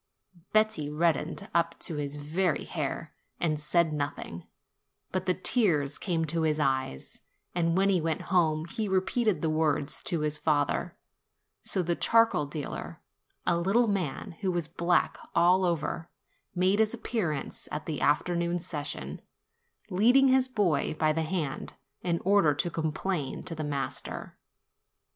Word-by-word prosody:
Betti 215 -9 +2
reddened 160 +1 0
up 170 0 +1
to 160 - -3
his 145 -1 -2
very 155 +4 0
hair, - - -4 0.3
and 155 -3 0
said 160 +1 +2
nothing, 145 - -4 0.6
but 185 0 -2
the 185 - +3
tears 170 - +1
came 165 -3 0
to 165 +2 -1
his 155 -1 +1
eyes; 130 - -1 0.3
and 170 0 +1
when 195 +1 +4
he 185 -3 +3
went 160 -1 -1
home, 160 -3 +3
he 215 +5 -3
repeated 195 +3 +1
the 160 - +2
words 155 -2 0
to 170 -3 0
his 150 0 -1
father; 155 +3 0 0.6
so 185 - 0
the 170 0 0
charcoal 230 -11 +3
dealer, 145 -1 -5 0.5
a 175 - +3
little 195 +8 +3
man, 185 -9 -2
who 190 -2 +1
was 175 -3 -1
black 170 +2 +1 0.2
all 180 +2 +5
over, 170 -1 -1 0.5
made 185 +3 +3
his 220 +1 +3
appearance 175 - -3
at 150 - -4
the 155 -3 -3
afternoon 170 +3 +1
session, 150 -4 -4 0.7
leading 245 +8 +5
his 260 0 +4
boy 200 - +1
by 155 0 +2
the 160 - 0
hand, 160 -4 -3 0.3
in 170 -2 0
order 190 -7 +4
to 175 +4 -1
com 160 -1 -1
plain 155 -5 -3
to 170 - -4
the 155 -1 -4
master. 145 -2 -3
170 Hz, 150 wpm, -29 LUFS, 150-185 Hz, 0.7 s, all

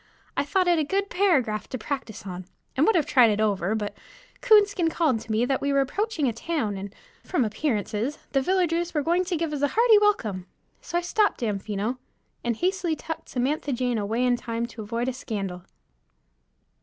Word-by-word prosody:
I - - +1
thought 365 +6 +1
it 345 -2 +4
a - - +2
good 395 +6 -1
paragraph 275 - +2
to 255 - -3
practice 235 -4 -5
on, 185 -1 -6 0.3
and 275 +4 +3
would 445 - +4
have 320 -5 +3
tried 245 -4 +5
it 210 0 0
over, 205 -1 +1
but 210 -2 -3 0.5
Coonskin 410 -7 +5
called 310 -8 +1
to 220 - -8
me 220 +3 +2
that 265 +1 0
we 280 - 0
were 275 - +3
approaching 300 - 0
town 235 -4 -2
and, 195 0 -6 0.3
from 285 -10 0
appearances, 220 +2 -1
the 270 - +2
villagers 345 0 0
were 300 - +1
going 345 +4 +2
to 355 -2 -1
give 320 -1 -2
us 290 - -3
a 285 - +4
hearty 450 - +5
welcome. 215 - +1 0.3
So 345 - -3
I - - +1
stopped 410 +1 +1
Damfino, 210 +2 -2 0.4
and 235 -1 0
hastily 360 - 0
tucked 320 +1 -7
Samantha 275 +2 -1
Jane 245 -2 0
away 225 +5 0
in 245 -1 +3
time 230 -1 -3
to 230 - -9
avoid 230 +3 -2
a 260 - 0
scandal. 195 -7 -5
265 Hz, 195 wpm, -26 LUFS, 220-345 Hz, 0.5 s, tried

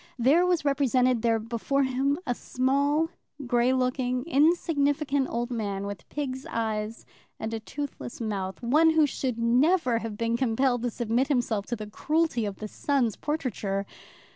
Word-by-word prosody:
There 290 +9 +4
was 350 -4 +1
represented 255 -3 +2
there 230 -1 +2
before 235 +5 -1
him, 270 +2 +1
a 245 - 0
small, 280 +6 +1 0.4
grey 240 0 +2
looking, 255 -1 0
insignificant 290 -3 +2
old 240 +1 -2
man, 200 -4 -2
with 200 -4 -7
pig's 265 -3 -4
eyes 220 -1 -3 0.3
and 220 +1 -4
a 225 - -2
toothless 280 +1 -6
mouth, 200 -3 -4
one 305 +7 +5
who 320 -1 +4
should 260 -4 -2
never 250 +2 +3
have 225 -2 -6
been 230 +1 0
compelled 245 0 +1
to 245 - 0
submit 235 +3 0
himself 240 -7 0
to 240 - -2
the 215 -2 -6
cruelty 300 +2 0
of 200 - -5
the 215 - -6
sun's 250 -2 0
portraiture! 220 -10 -2
250 Hz, 155 wpm, -27 LUFS, 225-280 Hz, 0.4 s, one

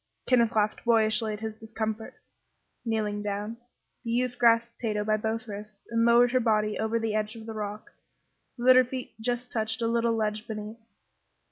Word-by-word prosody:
Kenneth 235 -3 +3
laughed 210 0 +1
boyishly 220 -2 +3
at 210 - -7
his 220 -1 -5
discomfiture. 220 0 -4 0.7
Kneeling 215 -3 -1
down, 210 +2 -3 0.5
the 230 - -5
youth 245 +1 0
grasped 235 0 +3
Tato 210 -3 -1
by 215 0 +2
both 225 +2 -2
wrists 210 0 -8
and 230 0 +2
lowered 240 +1 +5
her 255 - +3
body 215 -3 +1
over 220 +1 0
the 225 -1 -1
edge 215 +1 -1
of 225 -1 -10
the 225 - -6
rock 210 0 -6 0.7
so 240 - -6
that 255 +1 +8
her 255 - +7
feet 255 0 -6
just 245 +2 -2
touched 220 0 -1
a 230 - 0
little 230 0 +1
ledge 215 0 -2
beneath. 215 +1 -6
220 Hz, 180 wpm, -28 LUFS, 215-235 Hz, 0.7 s, that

